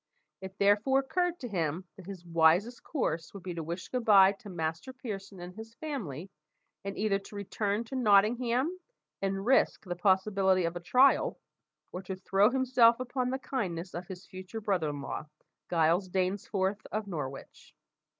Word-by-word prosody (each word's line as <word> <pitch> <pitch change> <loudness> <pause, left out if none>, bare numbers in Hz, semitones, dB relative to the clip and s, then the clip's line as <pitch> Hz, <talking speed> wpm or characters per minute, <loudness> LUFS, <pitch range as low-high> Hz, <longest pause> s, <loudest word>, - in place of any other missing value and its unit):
It 190 0 -9
therefore 205 +7 +3
occurred 350 +6 -1
to 250 - -4
him 175 -3 -2
that 190 -2 -13
his 190 -3 -8
wisest 170 +8 +3
course 170 - -3
would 195 - -9
be 180 -2 -4
to 165 - -4
wish 170 +3 -5
good 250 -2 -2
bye 195 -3 +7
to 200 +1 -11
Master 165 +7 -4
Pearson 200 -6 -7
and 175 +1 -8
his 225 +3 -10
family, 195 - -5 0.5
and 195 0 -5
either 205 -2 +1
to 200 +1 -13
return 205 +2 -2
to 250 +3 -8
Nottingham 245 - +3 0.4
and 195 0 -2
risk 265 -3 +3
the 175 -1 -3
possibility 190 0 +2
of 170 +1 -2
a - - -3
trial, 255 +10 +3 0.5
or 180 - -5
to 190 0 -5
throw 195 +2 +3
himself 250 -2 +4
upon 255 0 -2
the 260 - -1
kindness 185 -10 -4
of 175 +1 -6
his 185 0 -9
future 185 +3 -8
brother 190 -7 0
in 145 -1 -5
law, 150 - -5 0.4
Giles 170 +3 +2
Dainsforth 190 +2 -1
of 215 0 -2
Norwich. 145 -8 -7
195 Hz, 170 wpm, -30 LUFS, 180-230 Hz, 0.5 s, bye